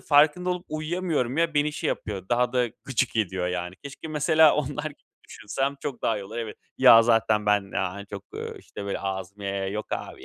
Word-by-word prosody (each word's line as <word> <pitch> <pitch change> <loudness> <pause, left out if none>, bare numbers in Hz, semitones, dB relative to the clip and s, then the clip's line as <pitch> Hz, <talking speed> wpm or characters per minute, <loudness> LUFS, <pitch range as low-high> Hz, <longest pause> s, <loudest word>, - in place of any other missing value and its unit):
farkında 155 +5 +4
olup 180 0 -3
uyuyamıyorum 155 -4 -1
ya, 165 -2 +2
beni 150 +1 +2
şey - - -2
yapıyor, 95 -3 -4
daha 120 0 +2
da 125 -1 +2 0.2
gıcık 130 -2 0
ediyor 95 -4 0
yani. 90 0 -3
Keşke 140 +3 -8
mesela 155 0 +5
onlar 150 +1 -2
gibi 150 -2 -6 0.3
düşünsem 135 +6 -2
çok 135 -5 -5
daha 110 -2 +1
iyi 100 - -7
olur. 110 +4 -9
Evet 110 -2 -5 0.2
"Ya, 115 -3 +9
zaten 110 -2 +2
ben, 100 -1 +2
aaa, 90 -1 -1
hani 100 0 -8
çok" 100 -1 -8
ııı, - - -6
işte, 100 - -9
böyle 100 - -2
ağzımı 95 +1 -5
yaya 100 0 -2
yaya, 95 0 -2
"Yok, 105 +2 -4
abi - - -5
120 Hz, 210 wpm, -26 LUFS, 100-150 Hz, 0.3 s, Ya